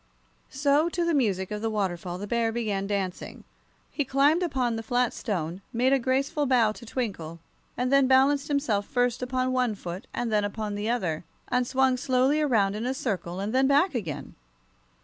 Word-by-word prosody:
So 285 +4 +2
to 345 0 -1
the 335 - +1
music 200 -9 0
of 210 0 -3
the 225 - -1
waterfall 180 -4 -2
the 200 - -5
bear 230 +1 0
began 210 -4 -2
dancing. 195 -3 -4 0.5
He 290 - -1
climbed 280 +5 +3
upon 255 -9 0
the 225 - -3
flat 245 +2 0
stone, 180 -4 -3
made 250 +3 +2
a 275 - +4
graceful 275 +4 0
bow 240 -4 +4
to 235 +2 -11
Twinkle, 190 -10 -4 0.4
and 250 +2 0
then 275 -1 +5
balanced 275 +2 +4
himself 250 -9 0
first 245 -1 0
upon 255 0 -1
one 250 -4 +1
foot 185 +4 -7
and 240 -2 -3
then 210 -1 +2
upon 205 +1 -3
the 205 +2 -2
other, 185 -10 -1 0.3
and 250 -1 +1
swung 265 0 +2
slowly 260 +4 +2
around 220 -9 +2
in 225 +3 -3
a 260 - -1
circle, 190 -8 -3
and 205 +3 -3
then 265 +1 +4
back 290 +6 +3
again. 180 - -5
245 Hz, 190 wpm, -27 LUFS, 205-265 Hz, 0.5 s, then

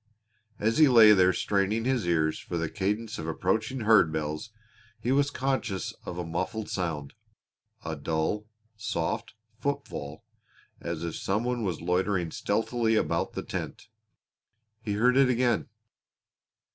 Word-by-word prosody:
As 110 +6 +1
he 155 - +8
lay 115 -4 +8
there 95 -3 +6
straining 100 +4 0
his 125 -8 0
ears 80 -2 +1
for 85 - -5
the 85 -1 -2
cadence 105 +3 -2
of 80 - -5
approaching 110 +9 -1
herd 110 -7 +5
bells 75 +5 -3 0.5
he 120 +3 -1
was 140 +1 +3
conscious 130 - -2
of 85 - -6
a 90 - -3
muffled 95 +6 -3
sound 80 -6 -3 0.7
a - - -3
dull, 80 +7 -2 0.3
soft 100 -2 -3 0.2
footfall, 80 - -4 0.6
as 85 -1 -4
if 85 -2 -3
some 105 +4 -1
one 125 -1 -1
was 95 -7 -2
loitering 90 -1 0
stealthily 115 +4 0
about - - 0
the - - -4
tent. - - -6 0.9
He 105 -2 -2
heard 125 +5 +3
it 135 -2 +5
again. 120 -2 +1
105 Hz, 140 wpm, -28 LUFS, 85-115 Hz, 0.9 s, he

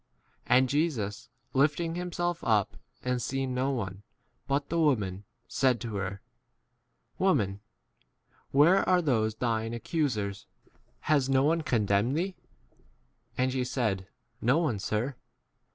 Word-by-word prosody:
d - - -44 0.2
And 130 +1 +5
Jesus, 130 -8 -1 0.2
lifting 150 +5 +2
himself 175 0 -2
up 105 -4 +2 0.3
and 125 -1 0
seeing 135 +1 -2
no 130 +2 0
one 100 -7 -3 0.5
but 140 +1 0
the 170 - 0
woman, 105 - +1 0.2
said 130 -3 +2
to 115 -3 -4
her, 100 +1 -4 1.0
Woman 105 - +2 0.9
where 160 +8 +5
are 180 -1 +4
those 110 -7 +1
thine 115 -1 -1
accusers? 110 - -2 0.5
Has 140 -3 +2
no 135 0 +4
one 165 +3 +2
condemned 110 0 +1
thee? 185 +3 -1 1.0
11 - - -30
And 130 +1 +2
she 130 -1 0
said, 110 -7 -1 0.3
No 125 +6 +3
one, 150 -11 0
sir. 115 +7 -2
130 Hz, 130 wpm, -29 LUFS, 110-150 Hz, 1.0 s, And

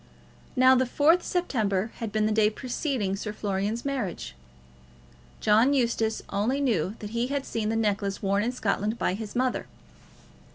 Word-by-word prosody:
Now, 255 +1 +6
the 260 0 +3
4th 320 +7 +4
September 220 - -1
had 225 -3 -4
been 215 0 +1
the 215 - +1
day 210 -1 +4
preceding 240 -3 -2
Sir 210 +2 -4
Florian's 205 +3 -2
marriage. 200 - -3 1.1
John 230 +7 +4
Eustace 230 -3 0
only 225 +8 0
knew 215 - 0
that 210 -1 -7
he 235 +1 0
had 280 0 -2
seen 215 -2 -2
the 225 - 0
necklace 205 -3 0
worn 200 0 +1
in 235 +3 0
Scotland 215 -2 -1
by 180 - 0
his 210 +1 -6
mother. 255 0 0
220 Hz, 160 wpm, -27 LUFS, 205-255 Hz, 1.1 s, Now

